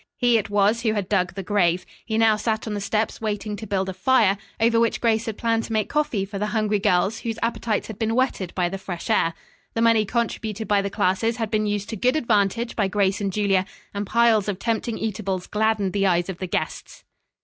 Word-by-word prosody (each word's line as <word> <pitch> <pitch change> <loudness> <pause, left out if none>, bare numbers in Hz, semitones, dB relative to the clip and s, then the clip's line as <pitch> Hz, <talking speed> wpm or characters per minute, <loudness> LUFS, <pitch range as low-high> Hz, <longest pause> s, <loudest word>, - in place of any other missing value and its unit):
He 240 -2 +4
it 210 - -5
was 205 +3 +2
who 220 -2 +1
had 205 -4 -2
dug 185 -3 0
the 195 - -4
"grave." 180 -3 +1 0.2
He 220 -1 -2
now 225 -1 +5
sat 220 +1 -1
on 215 - -3
the 205 - -3
steps 215 +3 -1
waiting 210 -1 -2
to 220 - -7
build 190 -1 -1
a 190 - -3
fire, 210 -4 +3 0.2
over 230 +1 +3
which 230 -1 +1
Grace 230 0 +1
had 220 - -4
planned 230 -1 0
to 225 - -5
make 215 -2 0
coffee 270 -10 0
for 200 0 -6
the 210 - 0
hungry 210 -1 +1
girls 195 +2 +2
whose 225 -1 -4
appetites 230 -2 -1
had 220 -2 -8
been 225 0 0
whetted 245 -8 0
by 180 -2 +1
the 195 +2 -5
fresh 185 +3 -5
air. 165 -6 +2 0.4
The 225 - +1
money 230 -2 +4
contributed 220 -1 -2
by 205 -1 +3
the 200 - -2
classes 205 +3 0
had 225 -2 -3
been 215 -1 +1
used 205 +1 -2
to 225 - -3
good 250 +6 +1
advantage 230 -3 +1
by 205 -3 +1
Grace 200 +1 +1
and 200 -1 -1
Julia, 195 -2 +2 0.3
and 200 0 -3
piles 230 -2 +3
of 200 - -2
tempting 230 +2 -2
eatables 195 -4 -3
gladdened 210 -3 0
the 200 -1 +2
eyes 175 0 +1
of 185 - -5
the 185 - -3
guests. - - -4
210 Hz, 230 wpm, -23 LUFS, 195-225 Hz, 0.4 s, now